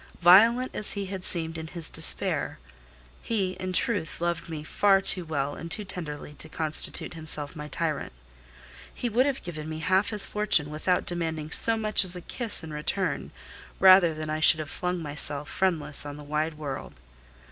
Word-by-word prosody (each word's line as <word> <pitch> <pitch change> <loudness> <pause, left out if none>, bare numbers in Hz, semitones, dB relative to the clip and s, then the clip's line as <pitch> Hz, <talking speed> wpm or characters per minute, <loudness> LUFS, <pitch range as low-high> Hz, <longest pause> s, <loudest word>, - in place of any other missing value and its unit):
Violent 230 +8 +6
as 210 - -2
he 200 -1 -4
had 190 -1 -6
seemed 165 -2 -1
in 160 - -7
his 165 0 -4
despair, - - 0 0.6
he, 200 -5 -1
in 185 0 -4
truth, 185 -4 0
loved 170 -1 -2
me 155 -2 -6
far 195 +5 +3
too 185 -1 0
well 145 -3 -2
and 170 - -8
too 210 - 0
tenderly 150 -6 -6
to 160 - -6
constitute 155 +1 -3
himself 155 -3 0
my 150 -1 -7
tyrant: 155 -1 -2 0.8
he 245 - -4
would 250 +5 +2
have 275 -1 -3
given 155 -3 -7
me 155 - -5
half 185 +5 +1
his 210 -2 +4
fortune, 195 -8 +3
without 180 +4 0
demanding 160 -3 -3
so 225 +6 +5
much 215 -2 +3
as 185 -1 +1
a 180 - -7
kiss 225 -1 -3
in 160 -1 -8
return, 150 +1 -2 0.5
rather 185 -4 +7
than 155 0 -6
I 155 - -2
should 155 0 +6
have 155 -1 -6
flung 180 0 -3
myself 145 -1 -2
friendless 165 -6 +1
on 145 0 -7
the 150 - -10
wide 150 +2 -2
world. 145 -3 -6
165 Hz, 180 wpm, -26 LUFS, 155-190 Hz, 0.8 s, rather